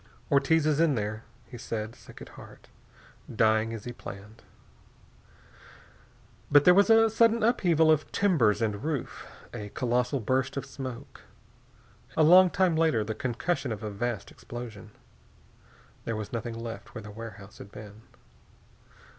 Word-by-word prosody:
"Ortiz's 150 +2 +3
in 165 -4 +3
there," 110 0 -4 0.2
he 120 - -11
said, 110 -1 -5
sick - - -13
at - - -13
heart. - - -15 0.6
"Dying 110 0 +2
as 115 -3 -6
he 120 - -6
planned." 105 -1 -11 2.1
But 145 0 +6
there 180 - +8
was 200 +2 +4
a 225 0 +6
sudden 230 +1 +3
upheaval 170 -8 +3
of 155 -1 0
timbers 130 - +2
and 105 0 -2
roof. 150 -3 -4 0.3
A 105 -1 -6
colossal 125 +4 -1
burst 130 +4 -1
of 140 - -3
smoke. 130 -3 -8 1.0
A 160 - +5
long 180 +4 +7
time 180 -2 +1
later 160 -9 +2
the 110 +1 -4
concussion 130 +4 -2
of 110 0 -5
a 105 - -4
vast 115 +1 -4
explosion. 115 -4 -9 1.2
There 115 - -2
was 110 0 -6
nothing 115 0 -4
left 115 +1 -8
where 110 - -7
the 105 - -9
warehouse 105 -2 -10
had 100 - -11
been. 105 0 -11
120 Hz, 145 wpm, -28 LUFS, 110-155 Hz, 2.1 s, there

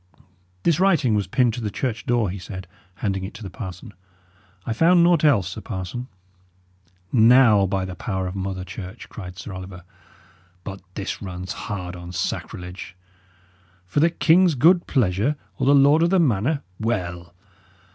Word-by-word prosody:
"This 170 -2 +2
writing 170 - +3
was 105 -2 0
pinned 125 -2 +2
to 120 - -5
the 105 - -2
church 115 +2 -3
door," 120 -6 +1
he 100 - -6
said, 95 +1 -8 0.3
handing 95 0 -2
it 95 - -7
to 110 - -9
the 95 - -7
parson. 105 +1 -8 0.7
"I 115 - -1
found 170 +8 +5
naught 170 -2 +4
else, 105 - +4
sir 110 - -7
parson." 105 +4 -5 1.0
"Now, 115 -3 +6
by 95 0 -1
the 95 - -6
power 95 0 -3
of 90 - -4
Mother 95 -1 -3
Church," 95 +3 -9
cried 90 -4 -9
Sir 95 - -7
Oliver, 95 -1 -8 0.8
"but 95 -1 -7
this 100 - -4
runs 90 -2 -6
hard 90 -4 -5
on 90 0 -9
sacrilege! 90 +1 -5 0.9
For 90 - -1
the 165 +3 +5
king's 170 0 +4
good 170 +7 +4
pleasure, 110 +3 +1 0.2
or 130 - 0
the 140 - +6
lord 140 +3 +5
of 170 - +3
the 190 0 +3
manor 140 - +1 0.2
well! 90 -6 -3
105 Hz, 165 wpm, -23 LUFS, 95-135 Hz, 1.0 s, Now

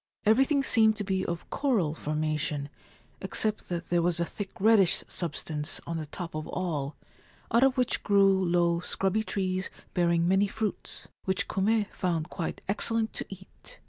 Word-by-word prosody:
Everything 270 +6 +4
seemed 220 -4 +4
to 210 - -3
be 190 -1 -1
of 170 -1 -4
coral 220 - +1
formation, 150 -2 -2 0.5
except 215 -1 -1
that 170 -1 -4
there 175 -1 +3
was 170 0 +1
a 170 - +1
thick 200 +3 -6
reddish 200 -3 +5
substance 155 0 -3
on 165 - -3
the 155 -2 -5
top 170 +3 -6
of 155 0 -4
all, 155 -6 -3 0.6
out 235 +2 +4
of 270 0 +3
which 250 -1 +1
grew 195 -2 +4
low 170 -1 +2
scrubby 190 +4 0
trees 185 -3 -2 0.2
bearing 170 -1 +2
many 195 +2 +3
fruits, 215 0 -4 0.2
which 190 -1 0
Kume 210 +2 +1
found 170 -2 -2
quite 170 - -4
excellent 220 +2 +1
to - - -5
eat. 195 - -11
185 Hz, 160 wpm, -28 LUFS, 170-215 Hz, 0.6 s, reddish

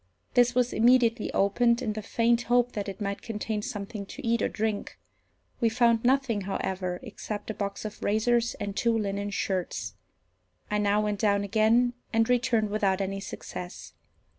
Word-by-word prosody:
This 245 -1 +4
was 250 -1 +2
immediately 235 -1 +3
opened 235 +4 +3
in 230 -5 -2
the 215 - -4
faint 235 +2 +2
hope 245 0 +3
that 205 -3 -4
it 195 - -7
might 200 -1 -3
contain 215 -1 -3
something 200 0 -5
to - - -8
eat 235 0 +2
or - - +1
drink. 215 -1 -3 0.6
We 230 - +3
found 235 -1 +3
nothing, 255 -4 +2
however, 185 -2 -3
except 215 -2 -6
a - - -5
box 200 0 -4
of 215 - -7
razors 235 +3 +1
and 200 -2 -5
two 230 0 +2
linen 200 -1 -2
shirts. 190 -3 -2 0.8
I 210 - +1
now 205 0 +2
went 210 -1 -1
down 200 -1 +2
again, 225 +4 +3 0.2
and 225 -1 +3
returned 235 -4 +2
without 200 -2 +1
any 195 0 -2
success. 180 -2 -8
215 Hz, 165 wpm, -28 LUFS, 200-235 Hz, 0.8 s, This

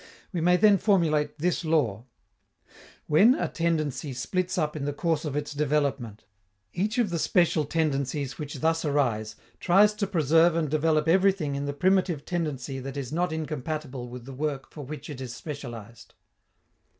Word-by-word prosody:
We 170 - -1
may 180 +2 +4
then 205 -1 +5
formulate 155 -8 +2
this 175 +3 0
law: 130 -9 0 1.0
_When 220 - +5
a - - 0
tendency 155 -5 -1
splits 185 +10 -2
up 155 -3 0
in 145 -2 -3
the 145 - -2
course 160 +1 -1
of 145 -2 -3
its 150 0 -3
development, 140 -7 -1 0.5
each 210 +6 -1
of 230 -7 +1
the 170 - -1
special 165 -2 +2
tendencies 140 -3 -1
which 145 -2 -6
thus 165 +1 +1
arise 125 -8 0 0.2
tries 200 +4 +5
to 210 -1 -2
preserve 165 -1 +3
and 155 -4 -1
develop 155 0 +2
everything 185 -4 +3
in 140 +1 -3
the 145 - -2
primitive 180 -1 +1
tendency 145 -7 -3
that 135 +2 -6
is 135 -1 -5
not 175 +1 0
incompatible 150 -4 -4
with 125 -1 -9
the 135 - -8
work 140 0 -3
for 150 - -8
which 150 +3 -8
it 140 -4 -7
is 125 -2 -6
specialized. 120 -7 -9
150 Hz, 165 wpm, -27 LUFS, 140-170 Hz, 1.0 s, then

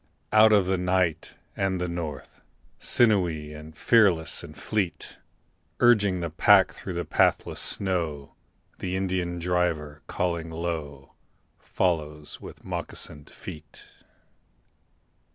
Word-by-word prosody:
Out 110 0 +7
of 100 -3 +5
the 95 0 0
night 90 -3 0 0.2
and 95 -1 -1
the 90 - -1
north, 85 -4 -6 0.4
Sinewy, 90 -10 +2 0.2
fearless 95 -9 +3
and - - -11
fleet, 95 -7 -3 0.6
Urging 105 -7 +4
the 85 -2 -3
pack 80 - +5
through - - -7
the - - -2
pathless - - +1
snow, 80 -7 -1 0.5
The 90 0 -3
Indian 90 -2 -1
driver, 85 -4 -1
calling 85 -2 -2
low, 80 -4 -5 0.5
Follows 75 -4 -2
with - - -11
moccasined 75 -1 -5
feet. 75 - -11
85 Hz, 105 wpm, -26 LUFS, 80-95 Hz, 0.6 s, Out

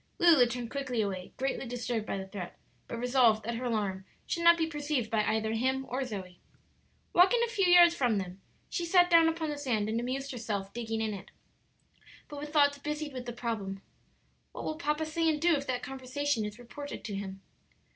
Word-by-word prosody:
Lulu 330 - +6
turned 235 -1 -5
quickly 265 -4 -2
away, 190 -3 -4
greatly 270 0 -2
disturbed 240 -2 -3
by - - -2
the 190 - -5
threat, 190 -2 -7 0.3
but 235 - -5
resolved 245 -3 +3
that 235 - -2
her 240 +2 -4
alarm 205 -5 -1 0.2
should 335 - -2
not 340 0 +7
be 325 - +1
perceived 295 -6 -2
by 220 -2 +2
either 220 +1 0
him 260 +3 0
or 260 +2 -2
Zoe. 190 -7 -7 0.7
Walking 370 +7 +6
a - - -6
few 420 -5 +1
yards 350 -1 +8
from 245 -9 +1
them, 185 0 -5 0.3
she 350 - -3
sat 355 +1 +4
down 330 -1 +7
upon 320 -1 -2
the 290 - -5
sand 225 -7 0
and 225 +1 0
amused 265 +3 -3
herself 210 -5 -4
digging 225 -1 -3
in 220 -1 -1
it, 195 - -9 1.0
but 290 -1 -8
with 295 +1 -6
thoughts 285 -2 +4
busied 300 0 -4
with 250 -1 -6
the - - -2
problem, 215 -5 -4 0.7
"What - - -6
will 310 - -2
papa 300 -1 -1
say 325 +1 +1
and 305 -1 0
do 340 +2 +4
if 280 -2 -1
that 250 -1 -2
conversation 270 -2 -2
is 210 +1 -6
reported 285 +4 -8
to 210 - -5
him?" 195 -1 -6
250 Hz, 205 wpm, -30 LUFS, 220-300 Hz, 1.0 s, yards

